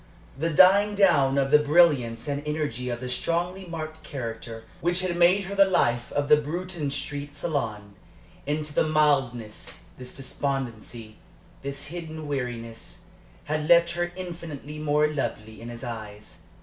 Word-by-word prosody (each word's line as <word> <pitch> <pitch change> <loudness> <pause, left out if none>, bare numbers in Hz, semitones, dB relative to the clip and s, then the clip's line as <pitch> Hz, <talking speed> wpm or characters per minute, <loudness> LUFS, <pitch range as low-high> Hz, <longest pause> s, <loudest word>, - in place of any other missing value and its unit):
The 160 +5 -1
dying 195 +5 +6
down 140 -9 +4
of 135 0 +1
the 150 - +8
brilliance 145 -7 +3
and 145 0 -2
energy 150 -5 -2
of 120 0 -4
the 125 - -4
strongly 175 +8 -2
marked 160 -1 -6
character, 115 -5 -6 0.2
which 175 +3 0
had 185 -2 -1
made 175 +3 +4
her 190 +1 -6
the 195 -1 +5
life 120 -9 +1
of 145 0 0
the 150 0 +7
Bruton 165 +1 -3
Street 145 +1 -4
salon, 110 -10 -3 0.5
into 150 0 -2
this 155 +1 +1
mildness, 135 -8 +1 0.3
this 125 0 -7
despondency, 125 -5 -4 0.4
this 140 0 -5
hidden 160 -3 -6
weariness, 120 -5 -5 0.4
had 155 +1 -2
left 170 0 +6
her 175 0 -2
infinitely 165 -5 -7
more 150 0 +2
lovely 110 -7 -4
in 115 - -7
his 120 +1 -9
eyes. 110 -4 -8
145 Hz, 150 wpm, -26 LUFS, 125-170 Hz, 0.5 s, the